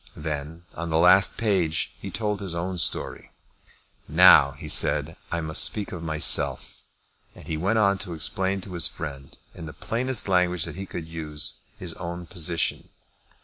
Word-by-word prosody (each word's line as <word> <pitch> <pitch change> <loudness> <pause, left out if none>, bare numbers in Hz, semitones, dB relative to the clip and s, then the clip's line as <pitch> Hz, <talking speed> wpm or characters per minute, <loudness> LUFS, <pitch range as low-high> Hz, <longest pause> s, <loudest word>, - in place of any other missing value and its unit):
Then, 75 +2 -6
on 85 0 -5
the 80 - +1
last 90 +3 +6
page, 90 -8 0
he - - -6
told 105 -2 -2
his 95 -4 -5
own 90 +1 -3
story. 70 - -1 0.8
"Now," - - +6
he - - -10
said, - - +1 0.2
"I 85 - -1
must 80 0 +3
speak 105 -2 0
of 90 - -7
myself:" 80 -2 +2 0.6
and - - -14
he 80 - -2
went 95 +8 0
on 100 -3 +2
to 90 -4 -5
explain 95 +5 -1
to 95 0 -9
his 85 -2 +2
friend, 70 -3 -8 0.2
in 80 - -9
the 75 - -9
plainest 125 0 -1
language 90 -3 +1
that - - -8
he 95 +1 -7
could 80 -3 -7
use, 75 -4 -4 0.2
his - - -7
own 85 +1 -7
position. 85 -3 -2
85 Hz, 170 wpm, -25 LUFS, 80-95 Hz, 0.8 s, last